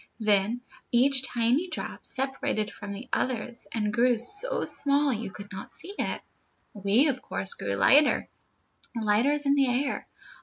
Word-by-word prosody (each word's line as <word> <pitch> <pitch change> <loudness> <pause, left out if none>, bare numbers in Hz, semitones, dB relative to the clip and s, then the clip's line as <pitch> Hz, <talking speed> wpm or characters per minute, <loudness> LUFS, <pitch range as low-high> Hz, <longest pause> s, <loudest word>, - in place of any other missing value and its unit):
Then 215 +2 +2 0.3
each 260 +2 +5
tiny 245 +9 +1
drop - - -5
separated 265 -5 -1
from 205 -1 -8
the 205 +6 -7
others, 240 -1 -2
and 210 -2 -1
grew 240 +1 +3
so 410 - 0
small 280 -1 +1
you 220 -2 -4
could 200 +1 -11
not 190 - -8
see 390 - -6
it. - - -2 0.5
"We, 205 +8 +3
of 260 -3 -1
course, 190 - -2
grew 100 0 -3
lighter, 280 - +4 0.7
lighter 230 +6 +2
than 285 -1 +1
the 275 -2 +3
air. 260 +3 -1
245 Hz, 150 wpm, -27 LUFS, 210-275 Hz, 0.7 s, each